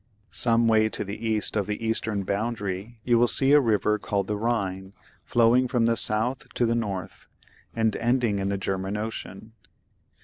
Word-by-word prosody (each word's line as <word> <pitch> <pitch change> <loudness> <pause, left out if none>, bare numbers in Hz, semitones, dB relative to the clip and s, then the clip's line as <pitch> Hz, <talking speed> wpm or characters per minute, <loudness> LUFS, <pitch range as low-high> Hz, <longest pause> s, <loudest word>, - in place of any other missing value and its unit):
Some 115 -1 +2
way 110 -1 +3
to - - -3
the 105 +3 -6
east 110 -1 -1
of 100 -3 0
the 105 +2 -4
eastern 110 -2 -1
boundary 105 +1 -3
you 120 0 +3
will 120 - +4
see 135 +3 +4
a 150 - +7
river 105 -4 +1
called 100 -1 -2
the 105 - -2
Ehine 100 -4 -2 0.3
flowing 120 +2 +3
from 120 -1 +1
the 115 0 +2
south 115 +3 0
to 120 - +2
the 115 - +1
north, 100 -6 -4 0.5
and 110 -2 +1
ending 115 -3 +1
in 100 0 -1
the 100 - -1
German 95 +1 -3
Ocean. 110 -1 -6
110 Hz, 175 wpm, -25 LUFS, 100-115 Hz, 0.5 s, a